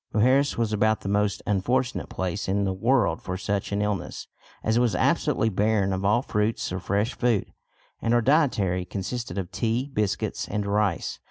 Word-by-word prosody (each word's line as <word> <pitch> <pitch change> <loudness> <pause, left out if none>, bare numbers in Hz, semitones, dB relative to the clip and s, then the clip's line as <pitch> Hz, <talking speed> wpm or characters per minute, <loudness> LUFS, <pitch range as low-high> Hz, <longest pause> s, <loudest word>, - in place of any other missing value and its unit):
Mujeres 130 +6 +3
was 115 -2 0
about 110 +1 +2
the - - -6
most 105 0 0
unfortunate 125 +6 0
place 95 +2 -3
in 100 +1 +1
the 95 -1 0
world 120 +7 +2
for 90 0 -4
such 100 +1 -2
an 100 +1 0
illness, 105 -3 -3 0.4
as 110 +1 +2
it - - +4
was 120 -6 +2
absolutely 110 - +2
barren 105 -1 +1
of 95 +1 -2
all 105 +5 +3
fruits 105 -5 -1
or 90 - -2
fresh 100 +6 0
food, 120 -5 0 0.5
and 115 - 0
our 120 - +4
dietary 110 - +2
consisted 100 +6 -5
of 95 -2 -3
tea, 115 +8 -1
biscuits, 105 -5 -1
and 105 0 -2
rice. 100 -3 0
105 Hz, 180 wpm, -25 LUFS, 95-120 Hz, 0.5 s, it